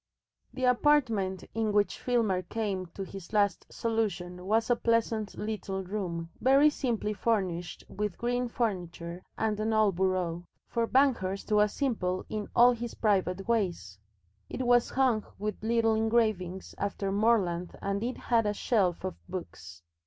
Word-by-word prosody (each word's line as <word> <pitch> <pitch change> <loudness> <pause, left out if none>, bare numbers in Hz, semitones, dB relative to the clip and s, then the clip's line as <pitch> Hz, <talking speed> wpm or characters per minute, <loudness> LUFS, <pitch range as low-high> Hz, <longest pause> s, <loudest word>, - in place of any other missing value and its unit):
The 260 - -6
apartment 240 -8 +2
in 220 -1 0
which 205 0 +1
Filmer 225 -7 +1
came 195 -3 -3
to 195 - -4
his 190 0 -10
last 200 -4 +1
solution 190 -6 -2
was 225 +3 +2
a - - +5
pleasant 230 -2 0
little 200 -3 -3
room 175 -4 -4
very 275 +4 +5
simply 230 -7 -1
furnished 190 -6 -1
with 210 -3 -3
green 245 +1 0
furniture 180 -7 -3 0.2
and 215 -1 0
an 220 +1 0
old 215 -4 +3
bureau 180 -2 0 0.2
for 230 -1 0
Banghurst 230 -8 +1
was 210 0 +4
simple 195 -10 -1
in 215 -1 -3
all 245 +1 +7
his 240 -1 -5
private 195 -2 0
ways. 175 - -1 0.5
It 255 - -3
was 245 0 +4
hung 250 -5 +2
with 210 0 -4
little 225 0 +2
engravings 220 -5 0
after 200 -1 -2
Morland 195 -5 +1
and 200 0 -2
it 250 +2 -2
had 230 -3 +1
a 210 - 0
shelf 195 -7 +1
of 185 -1 -2
books. 90 - -8
210 Hz, 145 wpm, -29 LUFS, 185-230 Hz, 0.5 s, all